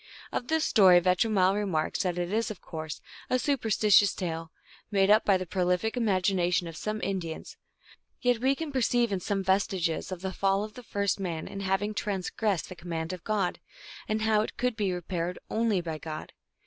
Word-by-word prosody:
Of 245 - -3
this 320 0 +1
story 185 -4 +7
Vetromile 185 +2 +3
remarks 190 -7 -1
that 180 -2 -1
"it 175 +2 -2
is, 225 +1 +1
of 210 -4 -7
course, 160 -2 -7 0.3
a 255 - +3
superstitious 220 -7 +3
tale, 165 -3 -4 0.4
made 195 -1 +3
up 215 +1 +6
by 195 -2 +4
the 185 - -4
prolific 180 +5 0
imagination 185 -6 +1
of 165 - -8
some 215 +5 -3
Indians, 180 -5 -4 0.6
yet 245 -2 +2
we 265 +3 +2
can 320 0 -5
perceive 240 -3 +2
in 195 - +1
it - - -8
some 195 +2 -1
vestiges 190 -3 0
of 180 -2 -5
the 190 0 -3
fall 195 +1 +1
of 215 0 -7
the 250 - -10
first 200 -4 -1
man 170 -4 -3
in 195 - -7
having 195 +2 0
transgressed 200 -1 -1
the 185 - -9
command 165 0 -4
of 180 - -8
God, 205 -4 -1 0.5
and 215 0 -1
how 220 -1 +3
it 215 - -5
could 250 -1 0
be 200 -3 0
repaired 180 0 -3
only 220 -4 +1
by 160 -2 -5
God. 155 -1 -7
195 Hz, 190 wpm, -28 LUFS, 180-215 Hz, 0.6 s, story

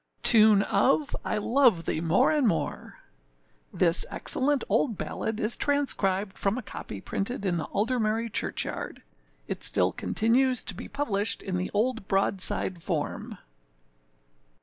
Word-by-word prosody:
Tune 215 -3 +7
of 270 +10 +1
I - - -2
love 230 - +2
thee 155 - -1
more 180 - +2
and 295 -5 +2
more. 170 - -3 0.7
[THIS 170 0 +3
excellent 280 +1 +1
old 230 -8 0
ballad 220 0 -4
is 215 +2 0
transcribed 205 -9 -1
from 200 +4 0
a 255 - -5
copy 105 - -8
printed 200 - -4
in 175 -3 0
Aldermary 225 +3 -1
church - - 0
yard. - - -7 0.4
It - - -5
still - - +2
continues 250 +3 +1
to - - -2
be 180 - -9
published 215 -7 -1
in 190 - -4
the 180 +1 -2
old 230 -1 -1
broadside 190 -2 +1
form. - - -4
215 Hz, 135 wpm, -26 LUFS, 195-255 Hz, 0.7 s, Tune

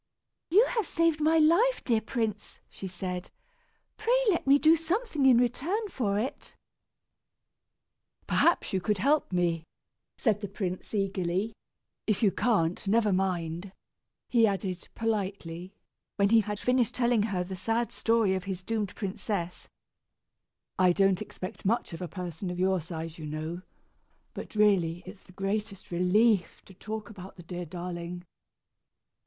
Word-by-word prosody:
"You 410 +8 +6
have 450 -8 -1
saved 330 -2 +1
my 320 +2 +4
life, 345 +11 +4
dear 230 -3 +2
prince," 220 -3 -3
she 195 - -7
said. 180 0 -5 0.7
"Pray 470 +3 +2
let 340 - -1
me 275 +1 +7
do 315 +3 +6
something 330 - 0
in 250 -3 +7
return 325 - 0
for 210 - -1
it." 240 +6 -4 1.7
"Perhaps 340 - +2
you 190 - +1
can 210 +3 +1
help 280 +8 +2
me," 170 -2 +1 0.5
said 215 -5 +1
the 205 - -4
prince, 190 0 -4
eagerly. 195 +1 -1 0.5
"If 215 0 +1
you 200 - +5
can't, 185 -3 +1
never 215 0 +3
mind," 180 -1 -2 0.5
he 230 -3 +4
added, 190 -3 -3
politely, 195 -5 -3 0.4
when 200 0 +3
he 225 0 +6
had 210 0 -4
finished 250 0 +1
telling 240 -3 +3
her 200 -4 -1
the 190 +1 -6
sad 225 +6 -1
story 225 -4 +2
of 190 0 -3
his 190 -2 -4
doomed 215 -2 -2
princess. 190 -3 -4 1.1
"I 180 -1 +5
don't 195 -1 +3
expect 185 +4 -7
much 215 -2 0
of 165 - -7
a 180 - -3
person 180 0 -5
of 180 0 -4
your 190 -1 +2
size, 165 0 -7
you 155 - -6
know; 155 +3 -4 0.7
but - - -8
really 185 -5 +3
it's 190 +1 -11
the - - -18
greatest 195 +1 -3
relief 180 +2 +2
to 190 - -14
talk 215 +3 -6
about 190 -2 -10
the 175 - -12
dear 175 0 -6
darling!" 175 0 -6
200 Hz, 150 wpm, -29 LUFS, 180-230 Hz, 1.7 s, me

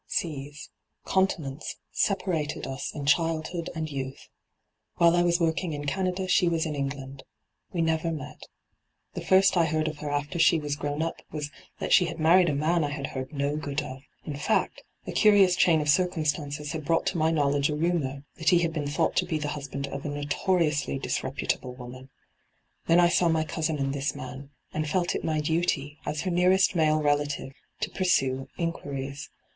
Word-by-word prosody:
Seaa, 145 -2 -3 0.4
continents, 160 -7 -1
separated 175 -7 -1
us 135 -1 -4
in 145 -2 -4
childhood 165 +2 +1
and 160 -1 -2
youth. 135 -2 -6 0.7
While 170 0 +5
I 175 - +4
was 175 0 +2
working 165 0 0
in 145 0 -5
Canada 185 +4 -1
she 180 -1 +4
was 165 -1 0
in 155 - -2
England. 135 -1 -4 0.5
We 170 -2 0
never 160 +1 0
met. 150 -4 -7 0.7
The - - -5
first 190 +1 +5
I 170 - +5
heard 155 0 0
of 155 -1 -4
her 150 - -4
after 145 +4 -2
she 165 - +5
was 145 -1 -2
grown 145 +1 -2
up 165 - -4
was 150 -1 -4 0.3
that - - -1
she 180 - +6
had 165 -1 -5
married 170 +3 +5
a 145 - 0
man 160 +3 +2
I 145 - 0
had 145 -1 -4
heard 130 +1 -5
no 140 0 -1
good 145 -1 -2
of. 130 +1 -8 0.2
In 150 - -4
fact, 145 - 0 0.2
a - - -4
curious 200 -4 +5
chain 165 -3 +4
of 150 - -3
circum 170 0 +2
stances 145 -1 -2
had 160 -2 -4
brought 165 +3 +1
to - - 0
my 160 +1 +3
knowledge 145 -2 +2
a 150 - -1
rumour 150 -4 -1
that 160 - +2
he 175 - +6
had 165 -1 0
been 150 -3 -2
thought 160 +3 0
to 180 - +3
be 160 -3 0
the 150 -1 -3
husband 140 -1 -4
of 140 0 -6
a 150 - -3
notoriously 150 0 0
disreputable 130 -1 -2
woman. 130 +1 -10 0.8
Then 170 +1 +5
I 175 -1 +6
saw 175 0 +3
my 160 -1 +2
cousin 155 0 -2
and 135 -1 -1
this 140 0 -2
man, 135 +2 -8 0.2
and 155 -1 -2
felt 180 +2 +1
it - - -3
my 155 -1 0
duty, 150 -2 -1
as 150 - -1
her 185 - -2
nearest 185 +2 +4
male 155 -2 +3
relative, 145 -2 0 0.3
to - - -2
pursue 135 -8 +1
inquiries. 140 -5 -4
155 Hz, 195 wpm, -27 LUFS, 145-170 Hz, 0.8 s, she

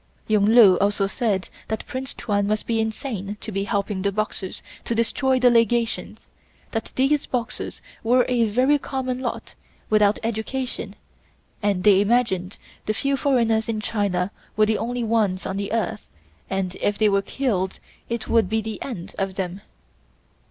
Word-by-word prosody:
Yung 210 -2 +3
Lu 215 -5 +7
also 200 0 +2
said 195 -2 -1 0.2
that 220 0 -3
Prince 260 +1 -5
Tuan 205 -1 0
must 215 0 -1
be 230 -1 0
insane 220 -3 -4
to 220 - -6
be 195 0 -1
helping 200 -2 -1
the 200 +1 +1
Boxers 210 -2 -3 0.2
to 235 - -2
destroy 260 +3 +2
the 250 -1 +5
Legations; 230 0 +1 0.4
that 225 -1 -3
these 275 +3 +2
Boxers 250 -1 -3 0.2
were 245 +2 +4
a 245 -2 +2
very 255 +7 +3
common 255 -2 -3
lot, 250 -2 -4 0.4
without 210 -1 +4
education, 235 +3 -3 0.7
and 200 -3 +1
they 200 -1 +6
imagined 205 -4 +1 0.3
the 215 - 0
few 275 +4 +1
foreigners 230 -5 +2
in 220 -1 -1
China 200 -4 -1 0.3
were 215 - +6
the 215 0 +1
only 240 +1 -2
ones 215 -5 +1
on 190 - -3
the 200 0 -3
earth 220 -1 -2 0.4
and 190 -1 -2
if 205 0 +1
they 215 - +4
were 200 -1 +3
killed 195 -5 -1 0.3
it 235 -1 -3
would 225 -5 +3
be 220 +1 +1
the 220 -1 -5
end 200 -7 -6
of 195 -1 -1
them. 190 0 -3
220 Hz, 165 wpm, -23 LUFS, 200-240 Hz, 0.7 s, Lu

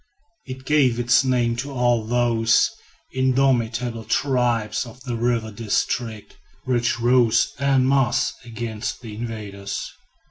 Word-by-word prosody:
It 130 0 -8
gave 130 -5 +3
its 120 +2 +4
name 120 -3 +1
to 135 +4 -4
all 120 -3 +1
those 115 -1 +2 0.4
indomitable 125 -3 +1
tribes 120 -3 0
of 125 +2 -13
the 125 -3 -3
river 115 -1 -1
district, 110 +1 -3 0.2
which 120 -2 0
rose 120 -1 +3
en 135 -2 +2
masse 135 -1 +2
against 115 -2 -5
the 115 -3 -8
invaders. 105 -3 -6
120 Hz, 115 wpm, -22 LUFS, 115-130 Hz, 0.4 s, its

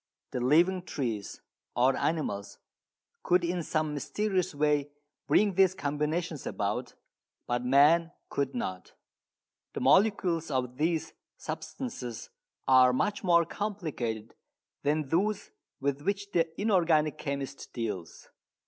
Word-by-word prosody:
The - - -2
living 170 +9 +3
trees, 115 - -4 0.3
or 130 +2 +4
animals, 105 -11 -2 0.6
could 180 - +3
in 175 +1 -1
some 155 -1 -1
mysterious 185 +3 -1
way 145 -1 +1 0.4
bring 205 -2 +4
these 190 0 +4
combinations 150 +1 -2
about, 105 +5 -2 0.5
but 120 0 -1
man 150 +6 +5 0.2
could 140 -1 -2
not. 95 -6 -4 0.8
The - - -3
molecules 185 -6 +3
of 125 -2 -2
these 160 +1 0 0.2
substances 125 - -6 0.4
are 130 -1 +6
much 200 +9 0
more 170 -2 +4
complicated 155 - -4 0.5
than 150 -1 0
those 200 +5 0 0.3
with 140 0 -1
which 200 +4 -2
the 165 -3 +2
inorganic 165 -7 +2
chemist 140 -1 -5
deals. 105 -8 -5
150 Hz, 110 wpm, -29 LUFS, 130-180 Hz, 0.8 s, are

